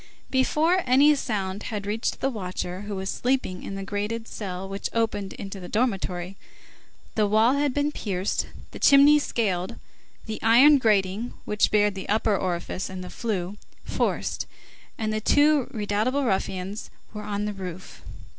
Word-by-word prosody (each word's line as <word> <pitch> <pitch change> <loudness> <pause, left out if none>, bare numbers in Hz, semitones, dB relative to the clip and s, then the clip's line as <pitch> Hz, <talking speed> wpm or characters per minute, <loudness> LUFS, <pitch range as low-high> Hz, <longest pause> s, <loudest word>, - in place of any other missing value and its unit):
Before 310 +7 +3
any 280 +4 +6
sound 205 -8 -2
had 210 -3 -4
reached 215 +3 -2
the 270 - +1
watcher, 185 -3 -4
who 205 - -3
was 190 0 -4
sleeping 245 -6 -1
in 195 - -6
the 195 - -4
grated 210 +3 -3
cell 190 -2 -5
which 195 +1 -4
opened 220 -4 -1
into 195 0 -7
the 180 - -8
dormitory, 195 -5 -1 0.8
the 215 -2 +2
wall 220 +4 +4
had 285 0 +1
been 290 +2 0
pierced, 195 -7 -2 0.2
the - - -9
chimney 285 +2 +7
scaled, 190 -10 -1 0.5
the 220 -1 -5
iron 265 +6 +7
grating 210 0 +1
which 210 0 +2
barred 210 -1 +3
the 190 -1 -7
upper 215 0 +2
orifice 185 0 -2
of 185 -1 -6
the 180 - -8
flue 200 -4 -3 0.3
forced, - - -1 0.5
and 215 -1 -1
the 215 - -1
two 290 +2 +4
redoubtable 215 +6 0
ruffians 190 -1 -2 0.2
were 210 - -5
on 205 0 -3
the 210 - -2
roof. 185 -2 -8
210 Hz, 155 wpm, -25 LUFS, 190-240 Hz, 0.8 s, chimney